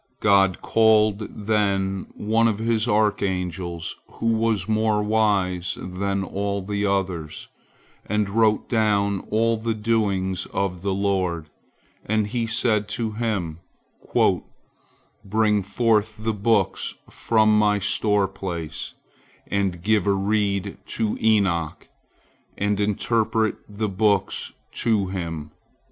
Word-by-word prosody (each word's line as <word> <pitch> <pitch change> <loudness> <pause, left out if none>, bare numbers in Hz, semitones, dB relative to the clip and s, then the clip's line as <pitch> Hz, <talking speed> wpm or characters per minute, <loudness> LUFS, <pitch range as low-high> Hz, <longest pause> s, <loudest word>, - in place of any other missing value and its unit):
God 95 -3 +3
called 110 -1 +3
then 100 -2 -1
one 110 +2 +2
of 110 -3 0
His 115 0 0
archangels 90 -5 -1 0.2
who 115 0 0
was 110 -4 0
more 110 -1 +1
wise 100 -4 +1
than 95 +2 -2
all 100 +1 -3
the 100 +1 -1
others, 90 -6 -2 0.6
and 105 0 0
wrote 110 +1 +2
down 100 -4 +1
all 115 +1 +2
the 110 0 -2
doings 100 -4 0
of 95 -3 -2
the 95 0 -1
Lord, 90 -6 -1 0.5
and 110 0 +1
He 115 +2 -2
said 110 -2 +2
to 115 -2 -2
him, 105 -8 -2 1.6
"Bring 105 0 +2
forth 110 +1 +1
the 110 +1 -2
books 105 -1 0
from 110 -1 +2
My 105 -1 +3
store 100 +1 +1
place, 90 -5 -6 0.5
and 95 -4 -1
give 105 -2 +2
a 100 - +4
reed 100 0 0 0.2
to 110 -2 0
Enoch, 95 -8 +1 0.7
and 105 0 0
interpret 110 +1 +1
the 105 +1 -2
books 100 -1 0 0.2
to 105 -5 0
him." 80 -5 -5
105 Hz, 115 wpm, -23 LUFS, 95-110 Hz, 1.6 s, a